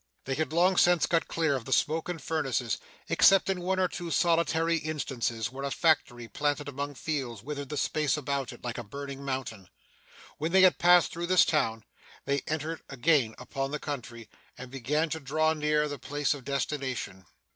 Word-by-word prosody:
They 135 - -2
had 155 +2 -1
long 180 +3 +3
since 175 -3 +5
got 165 -1 +1
clear 160 -4 +1
of 125 -4 -5
the 130 - -7
smoke 160 +6 +1
and 175 -2 -3
furnaces, 135 -6 -1 0.3
except 195 0 +5
in 185 -2 -3
one 185 +1 0
or 185 - +3
two 175 -1 -6
solitary 165 -1 +2
instances, 125 -8 -3
where 135 +1 -7
a 140 - -1
factory 135 -7 +1
planted 145 +2 -1
among 145 +1 -4
fields 130 -9 -4
withered 145 0 -5
the 150 - -4
space 150 0 +1
about 140 -2 -2
it, - - -13
like 120 -1 -4
a - - -5
burning 140 +4 -7
mountain. 125 -8 -4 0.7
When 160 +3 -2
they 190 - +7
had 185 - +5
passed 175 0 +5
through 170 +1 -4
this 185 0 +5
town, 115 -8 0 0.4
they 140 -1 0
entered 155 +1 -3
again 135 -4 +2
upon 135 +2 -4
the 150 - -3
country, 120 -6 -6 0.3
and 125 0 -9
began 145 +5 -1
to 160 - -2
draw 155 +2 +1
near 150 -1 +1
their 145 -2 -6
place 145 +4 -1
of 140 -4 -10
destination. 130 - -3
145 Hz, 190 wpm, -29 LUFS, 130-160 Hz, 0.7 s, they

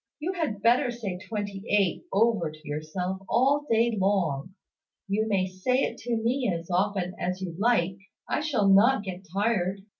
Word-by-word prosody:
"You 340 +5 -2
had 285 - -3
better 245 +3 +4
say 215 -7 -4
`twenty 205 -1 -5
eight' 200 - +1
over 210 -6 +2
to 155 0 -14
yourself 170 +6 -3
all 285 +4 +2
day 230 0 +3
long. 190 -5 0 0.5
You 210 +3 0
may 195 -3 +1
say 185 +8 0
it - - -3
to 235 -1 -1
me 240 0 0
as 170 +1 -5
often 185 0 0
as 180 +1 -2
you 185 -3 -5
like. 195 -5 +2 0.3
I - - 0
shall 280 -9 +1
not 205 +4 +5
get 190 -1 -7
tired. 195 -2 0
200 Hz, 170 wpm, -27 LUFS, 185-235 Hz, 0.5 s, not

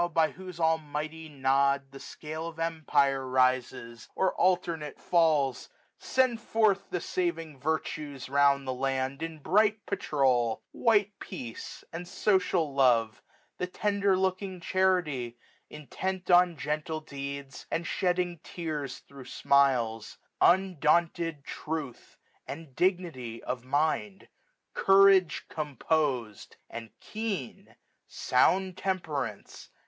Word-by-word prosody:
by 160 -1 +3
whose 185 -2 -10
almighty 160 0 -1
Nod 140 0 +1
the 135 - -10
scale 155 +4 -7
Of 165 -1 -8
empire 145 -5 +1
rises, 130 -2 0
or 190 - +1
alternate 170 -5 0
falls; 155 -6 +2 0.3
Send 255 -3 +1
forth 215 -4 +1
the 180 - -2
saving 165 -5 -3
Virtues 150 -1 -3
round 140 0 +3
the 130 - -1
land. 135 +1 -2
In 165 -1 -4
bright 210 +7 +2
patrol; 130 - +1
white 210 -3 +2
Peace, 125 -11 -8
and 175 +2 -6
social 180 -5 +1
Love; 120 -5 +3 0.4
The 180 - -1
tender 200 0 +1
looking 190 0 -1
Charity, 170 -11 0 0.3
intent 185 +5 -5
1605 180 - +3
On 175 -2 0
gentle 155 +3 -3
deeds, 140 -2 -7
and 170 - -2
shedding 180 -2 0
tears 150 -6 -5
thro' 140 -1 -11
smiles 125 -5 +1
j - - -24 0.2
Undaunted 170 -3 +2
Truth, 155 -5 -6 0.3
and 145 -2 -8
Dignity 170 -11 -1
of 125 -1 -4
mind; 155 +9 -1 0.4
Courage 195 -2 +5
composed, 140 -6 -2 0.2
and 115 -1 -7
keen; 210 - -5 0.3
sound 185 +8 +2
Temperance, 165 -9 -1
no 100 - -19
SUMMER. - - -14
155 Hz, 115 wpm, -29 LUFS, 135-180 Hz, 0.4 s, Courage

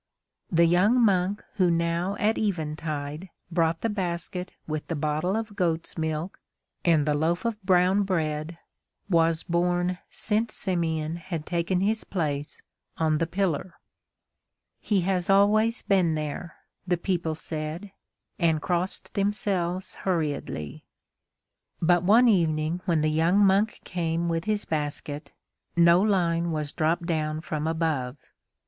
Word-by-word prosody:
The 170 -1 +5
young 185 +9 +4
monk 200 -3 +2
who 185 -3 +4
now 170 +3 0
at 215 +2 +1
eventide 155 -3 -3 0.2
brought 165 -1 +1
the - - +1
basket 180 -2 -3
with 155 -1 -4
the 165 - -2
bottle 155 +5 0
of 220 -2 -4
goat's 165 -3 -1
milk 160 +2 -3 0.4
and 160 -4 +3
the 150 - +2
loaf 165 +7 0
of 220 -2 -2
brown 185 +1 +3
bread 160 -4 -2 0.5
was 165 -1 +3
born 175 +1 0
since 220 +1 -1
Simeon 165 -4 -1
had 170 -3 -5
taken 175 +1 0
his 215 +3 +1
place 150 -5 -3 0.3
on 155 -2 +1
the 165 - 0
pillar. 180 -1 -1 1.0
"He 200 -3 +1
has 180 0 -1
always 215 +4 +4
been 185 -6 +2
there," 155 +3 -5 0.3
the 175 0 +2
people 170 -3 -1
said, 160 +5 -5 0.5
and 165 -3 +3
crossed 175 +3 -2
themselves 195 -3 -1
hurriedly. 150 - -2 1.0
But 175 +1 +3
one 220 +7 +5
evening 165 -4 +2
when 165 -3 +2
the 155 0 +2
young 165 +5 +3
monk 205 +1 +3
came 170 -1 -1
with 165 +1 -1
his 215 -1 -1
basket, 150 -1 -4 0.4
no 170 +1 +6
line 170 -5 +1
was 155 -2 -2
dropped 165 +1 0
down 155 -2 -1
from 155 -1 -3
above. 155 -5 -1
170 Hz, 130 wpm, -26 LUFS, 160-190 Hz, 1.0 s, no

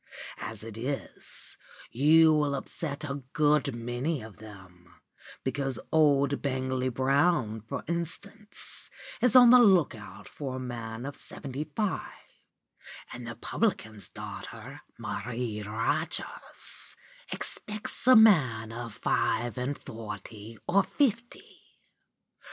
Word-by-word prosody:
As 110 -2 -6
it 110 -1 -8
is, 135 +4 -6 0.3
you 155 +5 +6
will 150 -2 +2
upset 145 +1 -5
a 140 0 -4
good 150 -3 +3
many 120 +4 -2
of 110 -3 -11
them, 95 -4 -14 0.5
because 135 0 -1
old 140 -3 +3
Bangley 130 -1 -1
Brown, 130 -3 +2
for 110 - -5
instance, 200 +6 -4 0.3
is 250 -1 +4
on 245 -2 +10
the 250 - +9
look 190 - +5
out 105 -3 -11
for 135 -3 -5
a - - -4
man 120 -1 -5
of 140 0 -5
seventy 140 +2 -6
five; 210 -3 0 1.1
and 120 -1 -7
the 115 - -6
publican's 110 - -1
daughter, - - -8 0.2
Marie 115 0 -4
Rogers, 115 +9 -3 0.4
expects 215 +3 0
a 255 - +9
man 130 - +5
of 115 -1 -6
five 120 -1 0
and 130 +3 -2
forty 110 0 -8
or 200 +2 +5
fifty. 240 0 -2
130 Hz, 115 wpm, -29 LUFS, 115-155 Hz, 1.1 s, on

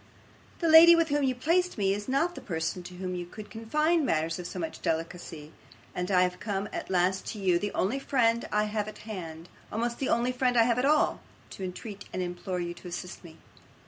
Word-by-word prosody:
The 335 - +2
lady 325 +2 +10
with 330 -1 +2
whom 290 0 +1
you 260 -2 +1
placed 350 +8 +1
me, 195 -2 +2
is 205 +1 -5
not 280 +7 +1
the - - -9
person 165 +1 -3
to 180 - -9
whom 180 0 -4
I 175 - -3
could 210 +2 -10
confide 305 +9 +1
matters 165 - 0
of 175 - -5
so 180 - -7
much 165 -3 -5
delicacy, 160 -2 -4 0.4
and 180 0 -3
I 180 -2 +4
have 180 0 -2
come 200 -1 -2
at - - -5
last 185 +1 +1
to 215 - -8
you, 180 -3 +2
the 205 +2 -3
only 230 +9 0
friend 235 -4 +1
I 210 0 +2
have 210 0 -2
at 215 - -8
hand 170 -6 -7 0.2
almost 235 +2 -2
the 270 - -1
only 240 +2 +2
friend 250 -1 +1
I 230 - +7
have 235 +1 +2
at 255 - +1
all 300 +2 +3 0.3
to 195 - -7
entreat 195 +3 -7
and - - -4
implore 180 +1 -4
you 175 0 -3
to 175 +1 -12
assist 180 +1 -7
me. 165 -2 -13
205 Hz, 225 wpm, -28 LUFS, 180-250 Hz, 0.4 s, lady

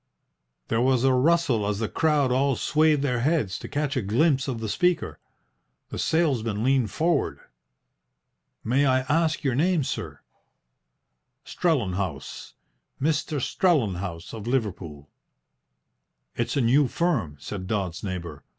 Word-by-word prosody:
There 115 +1 +1
was 130 -1 +2
a 135 -1 +4
rustle 130 -6 +2
as 105 -1 -1
the 110 +1 -1
crowd 150 -3 +1
all 135 +1 +2
swayed 155 0 +2
their 125 -4 0
heads 125 - 0
to - - -8
catch 145 -1 -2
a 130 - +1
glimpse 135 - +2
of 125 -4 -3
the 110 - -4
speaker. 180 - 0 0.7
The - - -6
salesman 120 -10 0
leaned 130 -3 +2
forward. 165 - 0 1.2
"May 135 +5 +2
I 130 0 +3
ask 155 +4 0
your 135 -3 +1
name, 165 +4 +2
sir?" - - -5 1.2
"Strellenhaus 100 - -2 0.4
Mr. 150 0 0
Strellenhaus 100 - 0
of 110 -1 -7
Liverpool." 95 - -3 1.3
"It's 120 +4 -2
a - - +3
new 130 +4 +4
firm," 120 - -1
said 95 +4 -6
Dodds's 95 -5 -2
neighbour. 85 -7 -5
130 Hz, 130 wpm, -25 LUFS, 105-150 Hz, 1.3 s, a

